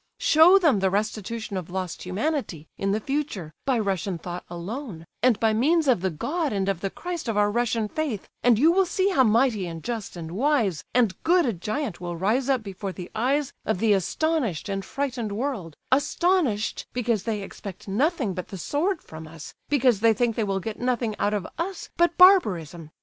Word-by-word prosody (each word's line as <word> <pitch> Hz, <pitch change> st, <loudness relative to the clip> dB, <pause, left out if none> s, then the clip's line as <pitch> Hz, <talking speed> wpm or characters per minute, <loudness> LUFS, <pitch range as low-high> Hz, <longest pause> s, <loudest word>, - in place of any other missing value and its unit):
Show 325 Hz, +5 st, +6 dB
them 310 Hz, -, +3 dB
the 190 Hz, 0 st, +2 dB
restitution 215 Hz, +1 st, -3 dB
of 180 Hz, -2 st, -6 dB
lost 185 Hz, -1 st, -4 dB
humanity, 190 Hz, -, -2 dB
in 195 Hz, 0 st, -1 dB
the 210 Hz, -, +1 dB
future, 220 Hz, -, -3 dB
by 265 Hz, -3 st, +2 dB
Russian 195 Hz, -3 st, -1 dB
thought 175 Hz, +2 st, -6 dB
alone, 175 Hz, -, -6 dB, 0.2 s
and 245 Hz, -2 st, +3 dB
by 220 Hz, -1 st, +3 dB
means 305 Hz, +8 st, +2 dB
of 245 Hz, -9 st, +3 dB
the 190 Hz, -, +1 dB
God 290 Hz, -, -2 dB
and 195 Hz, -2 st, -1 dB
of 195 Hz, -3 st, -1 dB
the 195 Hz, -, -1 dB
Christ 345 Hz, -, -6 dB
of 225 Hz, -2 st, -1 dB
our 205 Hz, 0 st, +3 dB
Russian 230 Hz, -1 st, 0 dB
faith, 265 Hz, -5 st, -3 dB
and 240 Hz, -3 st, +4 dB
you 310 Hz, +8 st, +5 dB
will 380 Hz, +1 st, +3 dB
see 375 Hz, +2 st, +1 dB
how 275 Hz, -9 st, +4 dB
mighty 225 Hz, -4 st, +2 dB
and 165 Hz, -1 st, -7 dB
just 230 Hz, -6 st, -4 dB
and 165 Hz, -2 st, -7 dB
wise 225 Hz, -, +1 dB
and 235 Hz, -6 st, +3 dB
good 345 Hz, 0 st, +3 dB
a 235 Hz, -, 0 dB
giant 215 Hz, -, -4 dB
will 175 Hz, -1 st, -4 dB
rise 230 Hz, +9 st, +1 dB
up 260 Hz, -4 st, +2 dB
before 195 Hz, -1 st, -5 dB
the 180 Hz, -1 st, -9 dB
eyes 270 Hz, +5 st, 0 dB
of 220 Hz, -, 0 dB
the 215 Hz, +2 st, +3 dB
astonished 225 Hz, -, -1 dB
and 195 Hz, 0 st, -2 dB
frightened 250 Hz, -2 st, -3 dB
world; 210 Hz, -, -3 dB, 0.2 s
astonished 285 Hz, -, +1 dB
because 235 Hz, -4 st, 0 dB
they 210 Hz, -1 st, -3 dB
expect 195 Hz, -1 st, -9 dB
nothing 250 Hz, -, 0 dB
but 180 Hz, 0 st, -5 dB
the 195 Hz, -, -7 dB
sword 315 Hz, -, -1 dB
from 160 Hz, 0 st, -10 dB
us, 160 Hz, -1 st, -10 dB, 0.2 s
because 255 Hz, -7 st, +3 dB
they 225 Hz, 0 st, +4 dB
think 235 Hz, 0 st, +1 dB
they 225 Hz, -, 0 dB
will 195 Hz, -2 st, -1 dB
get 215 Hz, +3 st, -6 dB
nothing 240 Hz, -3 st, -1 dB
out 205 Hz, +1 st, +1 dB
of 205 Hz, -, -3 dB
us 360 Hz, +1 st, -4 dB
but 345 Hz, 0 st, +2 dB
barbarism. 180 Hz, -, +4 dB
220 Hz, 200 wpm, -25 LUFS, 190-280 Hz, 0.2 s, Show